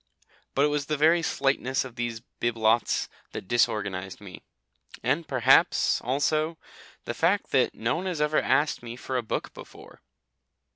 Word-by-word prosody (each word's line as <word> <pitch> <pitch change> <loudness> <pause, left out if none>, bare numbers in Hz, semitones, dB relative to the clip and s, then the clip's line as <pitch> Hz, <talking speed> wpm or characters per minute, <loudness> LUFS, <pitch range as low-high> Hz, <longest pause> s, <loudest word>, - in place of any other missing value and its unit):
But 140 - +4
it - - +2
was 145 -1 -2
the 150 - -1
very 160 +4 +4
slightness 135 -4 0
of 125 -3 -10
these 120 -2 -4 0.2
bibelots 115 -1 +1 0.3
that - - -7
disorganised 100 -5 0
me. 100 -3 -11 0.6
And 145 +7 0
perhaps, 130 -3 +3
also, 155 +5 0 0.5
the - - -3
fact - - +1
that - - +2
no 115 +7 -1
one 185 +3 -4
has 175 -4 -3
ever 150 0 +2
asked 150 - +1
me 120 0 -7
for 130 +1 -6
a 125 - +1
book 110 - -4
before. - - -14
130 Hz, 155 wpm, -26 LUFS, 115-150 Hz, 0.6 s, But